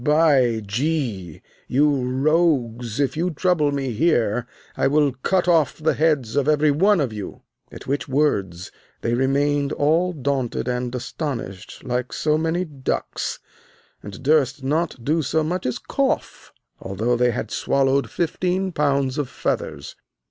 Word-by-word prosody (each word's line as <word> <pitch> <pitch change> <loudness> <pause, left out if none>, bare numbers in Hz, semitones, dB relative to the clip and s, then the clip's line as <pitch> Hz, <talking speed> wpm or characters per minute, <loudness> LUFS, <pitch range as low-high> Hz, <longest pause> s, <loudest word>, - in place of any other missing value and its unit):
By 140 -7 +3
G, 115 - -2 0.2
you 145 +3 +3 0.2
rogues, 130 -5 +1
if 135 -3 +1
you 170 +3 0
trouble 160 -2 +1
me 135 -2 -2
here, 120 -3 +1 0.3
I - - +2
will 145 0 +3
cut 185 +2 +1
off 165 -6 +3
the 155 +1 +1
heads 150 -7 +1
of 145 -1 +1
everyone 155 +6 +3
of 130 -7 -1
you. 105 -2 -7 0.3
At - - -10
which 135 -1 -2
words 100 - 0 0.3
they 115 - -1
remained 140 +3 +1
all 165 +6 +2
daunted 135 -6 -2
and 125 0 -2
astonished 115 - -5
like 125 -1 -2
so 150 0 +1
many 165 +3 0
ducks, 140 -5 -3 0.6
and 100 +4 -10
durst 140 -2 +2
not 150 -2 -1
do 160 +3 +2
so 155 +2 0
much 175 +1 -2
as 125 -1 -2
cough, 270 - -2 0.3
although 110 +6 -1
they 125 +1 +3
had 110 -2 -3
swallowed 135 0 +1
fifteen 180 +2 -1
pounds 140 -3 0
of 140 -4 -2
feathers. 70 - -3
140 Hz, 140 wpm, -22 LUFS, 125-155 Hz, 0.6 s, By